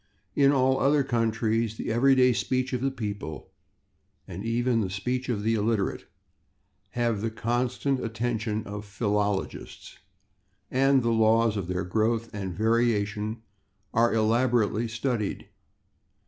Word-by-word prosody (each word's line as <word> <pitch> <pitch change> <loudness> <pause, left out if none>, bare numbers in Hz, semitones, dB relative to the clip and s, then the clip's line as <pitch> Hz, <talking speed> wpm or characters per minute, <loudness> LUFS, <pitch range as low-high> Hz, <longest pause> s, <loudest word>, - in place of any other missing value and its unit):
In 140 -1 +5
all 130 -1 +2
other 140 +1 +3
countries 115 -2 0
the - - -3
everyday 125 +1 +4
speech 130 +2 -1
of 125 - -1
the 135 - +1
people, 105 -10 -6 0.8
and 95 +4 -7
even 115 +1 +1
the 95 - -2
speech 125 +7 -3
of 105 -4 -1
the 115 +1 +2
illiterate, 110 -2 -1 0.9
have 115 -4 0
the 115 - -1
constant 120 +4 -1
attention 110 -1 -2
of 105 +1 -6
philologists, 105 -1 -3 0.7
and 135 0 +3
the 115 - +1
laws 110 0 +3
of 100 -4 -3
their 90 0 -2
growth 110 +4 0
and 100 -3 -4
variation 110 0 0 0.5
are 115 +1 +3
elaborately 115 0 +2
studied. 115 -2 -2
115 Hz, 125 wpm, -27 LUFS, 105-125 Hz, 0.9 s, In